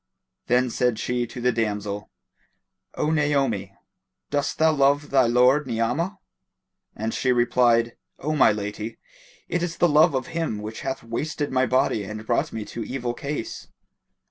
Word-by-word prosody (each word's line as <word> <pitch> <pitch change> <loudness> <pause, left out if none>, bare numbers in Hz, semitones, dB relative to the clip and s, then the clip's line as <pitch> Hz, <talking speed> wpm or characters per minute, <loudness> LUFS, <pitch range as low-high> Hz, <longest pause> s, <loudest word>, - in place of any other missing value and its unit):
Then 125 0 +2
said 125 -2 +1
she 120 +1 -1
to 125 - -8
the 125 +1 +2
damsel, 105 -3 -2 0.9
"O 155 - 0
Naomi, 135 -11 0 0.6
dost 145 -1 -1
thou 160 0 +4
love 145 0 +2
thy 130 -3 +4
lord 125 +4 +4
Ni'amah?"; 125 - -1 0.8
and 110 +1 -3
she 130 - +1
replied, 120 -1 +3 0.2
"O 155 +3 -2
my 135 - +6
lady, 105 +2 -5 0.5
it 175 0 -1
is 170 -1 -3
the 175 - +4
love 155 0 +5
of 130 - -1
him 165 -10 -1
which 110 +1 -6
hath 135 0 -4
wasted 145 +6 -3
my 130 -1 +2
body 130 -5 +1
and 105 +2 -7
brought 120 +1 0
me 110 -2 -5
to 115 - -6
evil 125 -1 -3
case." 140 -2 -5
125 Hz, 155 wpm, -24 LUFS, 115-145 Hz, 0.9 s, my